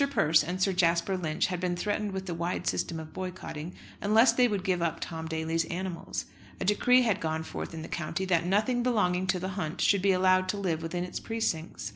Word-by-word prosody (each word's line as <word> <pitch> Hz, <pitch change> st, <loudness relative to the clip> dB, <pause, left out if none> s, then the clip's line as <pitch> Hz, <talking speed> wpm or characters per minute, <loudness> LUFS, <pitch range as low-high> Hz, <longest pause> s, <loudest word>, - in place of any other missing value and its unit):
Persse 155 Hz, -, +4 dB
and 180 Hz, +2 st, -4 dB
Sir 190 Hz, +1 st, +2 dB
Jasper 170 Hz, +1 st, +2 dB
Lynch 160 Hz, -3 st, 0 dB
had 180 Hz, -1 st, -2 dB
been 180 Hz, -1 st, -1 dB
threatened 205 Hz, +2 st, -1 dB
with 190 Hz, 0 st, -5 dB
a 175 Hz, -, -2 dB
wide 175 Hz, +1 st, -2 dB
system 165 Hz, -2 st, -1 dB
of 155 Hz, 0 st, -9 dB
boycotting, 180 Hz, -3 st, -6 dB, 0.3 s
unless 220 Hz, +5 st, +5 dB
they 250 Hz, -1 st, +4 dB
would 205 Hz, -5 st, -2 dB
give 185 Hz, -3 st, 0 dB
up 170 Hz, -1 st, -1 dB
Tom 160 Hz, -1 st, -5 dB
Daly's 160 Hz, +1 st, -1 dB
animals. 175 Hz, +1 st, -4 dB, 0.3 s
A -, -, -2 dB
decree 250 Hz, +6 st, +4 dB
had 215 Hz, -4 st, +1 dB
gone 160 Hz, 0 st, -1 dB
forth -, -, -6 dB
in 160 Hz, -1 st, -6 dB
the -, -, -7 dB
county, 170 Hz, +4 st, -3 dB
that 180 Hz, -3 st, +2 dB
nothing 215 Hz, +7 st, +1 dB
belonging 190 Hz, -7 st, +1 dB
to 185 Hz, 0 st, +2 dB
the 185 Hz, +2 st, -3 dB
hunt 180 Hz, -4 st, -4 dB
should 200 Hz, -2 st, +3 dB
be 195 Hz, 0 st, +4 dB
allowed 185 Hz, 0 st, +3 dB
to 205 Hz, -, 0 dB
live 175 Hz, -5 st, -1 dB
within 170 Hz, +2 st, -3 dB
its 180 Hz, -, -5 dB
precincts. 220 Hz, -8 st, -3 dB
180 Hz, 220 wpm, -29 LUFS, 165-195 Hz, 0.3 s, unless